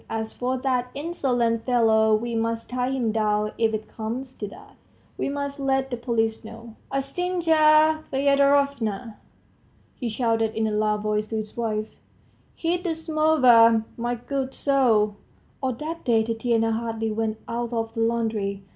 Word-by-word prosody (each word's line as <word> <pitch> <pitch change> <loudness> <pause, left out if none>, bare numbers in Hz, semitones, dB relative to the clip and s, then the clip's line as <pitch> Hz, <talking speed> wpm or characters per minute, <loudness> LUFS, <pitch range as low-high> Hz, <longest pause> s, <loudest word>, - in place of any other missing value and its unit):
As 220 0 -3
for 255 +1 -2
that 250 -1 -1
insolent 250 -7 0
fellow, 220 -3 +3
we 235 +2 -3
must 230 +1 -2
tie 250 0 -1
him 255 -4 0
down 210 -1 0
if 225 -1 +3
it 215 0 -4
comes 240 +5 -5
to 205 - -4
that, 415 - -14 0.4
we - - -2
must 280 0 -4
let 270 -1 0
the - - 0
police 230 -2 -1
know... 230 +1 -11 0.2
Ustinya 310 +1 +3
Fyedorovna!" 275 -6 +1 0.8
he 245 - -4
shouted 225 -1 0
in 220 0 0
a 215 - 0
loud 210 0 0
voice 210 0 0
to 225 - -4
his 215 -1 -4
wife, 215 -2 -3 0.6
"heat 345 +1 -1
the 340 -4 -1
samovar, 260 -9 +4
my 240 +1 -2
good 265 +2 -4
soul.. 225 -7 +2 0.2
." - - -36
All 260 -2 0
that 315 +7 -6
day 225 -2 +3
Tatiana 225 0 0
hardly 225 -1 -2
went 220 0 -2
out 235 0 -3
of 225 -1 -2
the - - -5
laundry. 220 -4 -1
235 Hz, 155 wpm, -24 LUFS, 220-275 Hz, 0.8 s, samovar